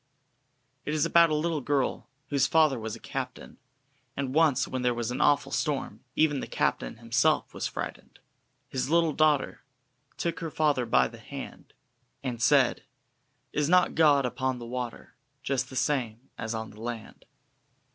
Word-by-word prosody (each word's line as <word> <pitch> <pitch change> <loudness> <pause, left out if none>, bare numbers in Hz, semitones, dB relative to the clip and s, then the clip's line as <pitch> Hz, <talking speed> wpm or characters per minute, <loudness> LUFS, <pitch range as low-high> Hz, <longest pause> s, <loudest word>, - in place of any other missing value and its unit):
It 150 - -2
is 150 - +2
about 170 -1 +5
a 155 - +1
little 155 0 0
girl 135 0 -1 0.2
whose 140 -1 +2
father 155 -6 +3
was 110 -1 -5
a - - -11
captain, 130 -2 -6 0.6
and 135 -2 -2
once 150 -5 +3
when 130 - -3
there 125 -1 +1
was 120 0 -2
an 125 - -2
awful 145 -1 +3
storm, 145 -3 -1
and - - -21
even 150 -3 +3
the - - -5
captain - - -1
himself 120 +7 +1
was - - -2
frightened: - - -7 0.3
" - - -46
his 130 0 -2
little 165 -1 +3
daughter 150 -3 +2 0.6
Took 170 -1 -2
her 165 -2 -4
father 145 -6 +1
by 65 - +4
the - - -12
hand, - - -9 0.5
And 125 -3 -4
said: - - +4 0.7
'Is 150 0 +1
not 180 0 +4
God 145 -4 +4
upon 130 +1 -1
the 120 - -8
water 125 0 -6 0.3
Just 135 -2 -1
the 130 - -10
same 130 -3 -1
as 110 +1 -4
on 110 0 -5
the 105 - -13
land?'" 115 -2 -7
135 Hz, 170 wpm, -28 LUFS, 120-155 Hz, 0.7 s, about